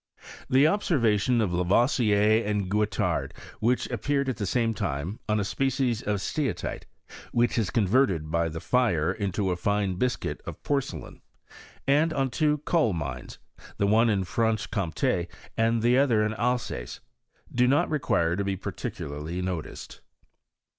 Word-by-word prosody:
The 135 +3 +5
observation 125 - +2
of 95 -5 0
Lavoisier 105 +3 +3
and 105 -2 -2
Guettard, 105 0 0 0.2
which 120 +2 +1
appeared 140 +4 0
at 130 - -2
the 105 -4 -2
same 115 +1 +1
time, 80 +2 -3
on 105 0 +2
a - - 0
species 130 +1 0
of 105 -1 -1
steatite, 150 +2 -3 0.5
which 120 0 +2
is 110 -5 0
converted 100 - +2
by 85 0 +1
the 80 +1 -6
fire 100 -7 +1
into 100 -2 -1
a - - 0
fine 100 0 0
biscuit 125 +4 -2
of - - -8
porcelain, 140 -2 -3 0.6
and 150 +4 +3
on 135 -3 0
two 150 +2 +2
coal 155 - +2
mines, 65 -7 -5 0.4
the 100 - +1
one 110 +3 +4
in 100 -3 +1
Francbe 110 +3 0
Comt^, 100 +5 -1
the 120 +2 +4
other 115 -6 +3
in 110 - -1
Alsace, 120 - -2 0.5
do 125 +1 +3
not 140 +3 +3
require 85 - +1
to 100 - -1
be 100 -1 -2
par - - -5
ticularly 75 +5 -5
noticed. 90 -4 -6
110 Hz, 145 wpm, -27 LUFS, 95-125 Hz, 0.6 s, The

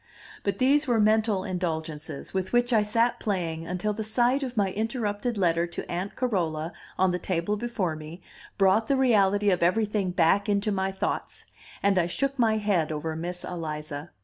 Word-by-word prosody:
But 200 - -1
these 275 +3 +3
were 235 -3 +2
mental 215 -2 +3
indulgences, 160 -5 -4
with 190 +2 -2
which 245 +1 +3
I 220 - +5
sat 230 +3 +1
playing 165 -5 -2
until 185 +4 -1
the 220 +1 -4
sight 245 +5 +2
of 255 -3 -5
my 195 -2 +2
interrupted 220 +1 -2
letter 170 -2 +2
to 170 - -6
Aunt 180 +3 -3
Carola 170 -9 -1 0.2
on 190 0 +3
the 180 - -1
table 180 +3 -1
before 205 -7 -2
me 155 +3 -9 0.4
brought 195 +3 +3
the 275 - +2
reality 205 -5 +3
of 180 - +1
everything 205 +2 +1
back 180 +3 +2
into 205 +1 +1
my 190 -1 0
thoughts; 190 +1 -3 0.4
and 195 -1 +4
I 170 - +1
shook 275 +9 -1
my 220 -2 +3
head 195 -7 +1
over 155 +1 -3
Miss 175 +2 -5
Eliza. 155 -2 -5
195 Hz, 175 wpm, -27 LUFS, 170-220 Hz, 0.4 s, I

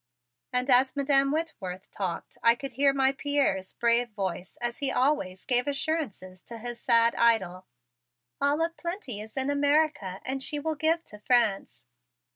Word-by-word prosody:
And 250 +1 0
as 260 +2 +5
Madam 275 -1 +3
Whitworth 210 - -4
talked 185 -4 -5
I 230 0 +5
could 275 +2 -7
hear 275 +3 +3
my 270 -1 +3
Pierre's 275 -9 -1
brave 240 +1 +2
voice 190 -4 -5
as 240 0 -3
he 275 -2 +1
always 250 -10 0
gave 245 +1 +2
assurances 275 - -3
to 235 - -9
his 240 +1 -7
sad 230 0 +4
idol. 190 -6 +1 0.7
"All 285 +3 +2
of 335 0 -7
plenty 340 - -5
is 220 +4 -12
in 265 +1 +1
America, 285 -9 +1
and 265 +1 -3
she 295 - +1
will 315 +2 -2
give 320 +2 0
to 210 - -13
France." 205 - 0
250 Hz, 160 wpm, -27 LUFS, 210-285 Hz, 0.7 s, as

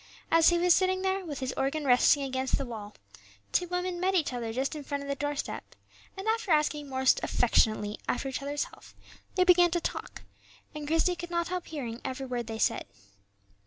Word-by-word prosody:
As 330 0 +6
he 345 - +2
was 350 0 +5
sitting 375 0 +2
there, 380 0 0
with 295 -6 -6
his 260 0 -2
organ 285 +3 -1
resting 265 +2 +5
against 260 -1 -1
the 275 - -3
wall, 215 -4 -8 0.6
two 355 - +1
women 360 0 -2
met 380 +1 +1
each 310 -7 +1
other 235 -2 -3
just 265 +6 -2
in 300 - -5
front 280 0 -4
of - - -8
the - - +1
doorstep, 290 +1 -4 0.4
and 385 +3 -5
after 445 -2 0
asking 300 -2 +2
most 260 0 +3
affectionately 215 -3 +2
after 260 - -1
each 265 - -4
other's 285 +1 -1
health - - -14 0.4
they 365 - +4
began 355 -1 +6
to 345 +1 0
talk, - - -5 0.5
and 300 -1 -6
Christie 325 +3 +2
could 345 0 -7
not 340 0 -1
help 365 -1 -3
hearing 245 -6 -5
every 265 0 -4
word 245 -3 -3
they 225 -1 -4
said. - - +1
290 Hz, 200 wpm, -29 LUFS, 260-350 Hz, 0.6 s, As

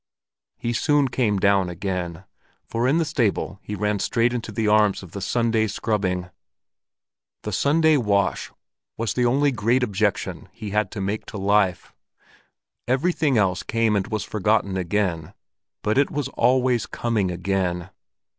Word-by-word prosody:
He 120 - -2
soon 145 +2 +2
came 115 -5 +1
down 100 -1 +3
again, 90 -1 -4 0.4
for 115 +2 -1
in 140 +5 +3
the 165 - +1
stable 115 - -1
he 105 - -5
ran 105 0 -1
straight 115 +4 +1
into 115 -2 -4
the 110 +1 -1
arms 105 -2 +3
of 90 - -12
the 100 - -6
Sunday 115 +1 +1
scrubbing. 95 -4 -2 1.1
The 105 - -4
Sunday 155 - +3
wash 100 -5 0 0.5
was 115 -3 -1
the 125 -1 +2
only 140 +4 +3
great 120 +2 +1
objection 105 -6 -1
he 105 -2 -7
had 105 -1 +1
to 100 - -4
make 100 +3 -3
to - - -7
life; 100 -2 +1 0.9
everything 140 +1 +1
else 95 -3 +2
came 115 -2 +1
and 100 0 0
was 110 -2 -2
forgotten 105 -1 0
again, 90 -3 -1 0.5
but 110 +5 +2
it 140 - +3
was 145 -2 -3
always 125 -2 +2
coming 110 -5 -1
again. 90 0 -2
105 Hz, 150 wpm, -23 LUFS, 95-120 Hz, 1.1 s, down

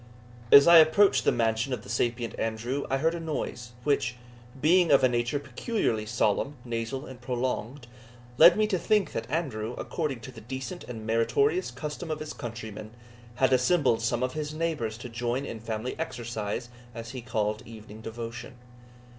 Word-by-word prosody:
As 140 +2 +10
I 170 0 +10
approached 160 +6 +5
the - - +5
mansion 115 +2 0
of 110 -4 -4
the - - -13
sapient 115 +2 -1
Andrew, 115 +5 -2
I 135 - +1
heard 160 +4 +1
a 170 - -4
noise, 140 -6 -4
which, 130 -3 +1 0.4
being 170 +4 +4
of 140 -2 +5
a - - +7
nature 120 +2 0
peculiarly 130 - -2
solemn, 120 +5 0
nasal, 120 +4 -3
and 130 -3 -11
prolonged, 125 +1 -3 0.5
led 170 +3 +9
me 215 - +3
to 200 -4 0
think 205 +3 +2
that 115 - -4
Andrew, 125 -7 -2
according 145 -7 -3
to 120 - -9
the 115 -3 -12
decent 130 - -6
and 115 -3 -7
meritorious 120 +9 +2
custom 150 +6 -6
of 155 -1 -2
his 155 0 -6
countrymen, 110 -4 -7 0.5
had 130 +1 +3
assembled 130 -3 +3
some 120 +2 0
of 130 - -1
his 150 0 -4
neighbours 155 -10 -2
to 120 - -8
join 120 +3 -2
in 115 - -6
family 110 +2 -4
exercise, 120 -6 -4 0.3
as 115 0 -7
he 130 -2 -6
called 110 -2 -1
evening 110 -1 -11
devotion. 115 +3 -7
125 Hz, 170 wpm, -28 LUFS, 115-150 Hz, 0.5 s, As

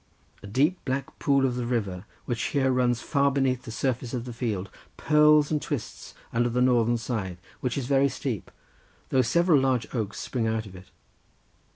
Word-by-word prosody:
A 100 - -9
deep 145 - +1
black 135 0 -4
pool 140 -1 +3
of 125 -2 0
the 125 - -2
river, 100 -6 -2 0.2
which 120 -1 -2
here 135 -2 +3
runs 125 -1 +1
far 140 -1 +2
beneath 135 -2 +1
the 115 - -6
surface 125 +1 -2
of 120 -1 -4
the 120 - -6
field, 105 -6 -3 0.3
purls 150 0 +4
and 150 -1 +1
twists 140 -8 -5 0.2
under 120 +1 +2
the 120 +1 -1
northern 120 -2 +3
side, 105 -7 -4 0.2
which 125 0 -2
is 135 - -2
very 140 +1 +3
steep, 120 -10 -4 0.6
though 130 - +3
several 165 +5 +3
large 130 -3 +1
oaks 110 -5 -3
spring 120 -4 -2
out 110 0 -1
of 95 -2 -11
it. 95 +1 -13
125 Hz, 185 wpm, -26 LUFS, 115-135 Hz, 0.6 s, purls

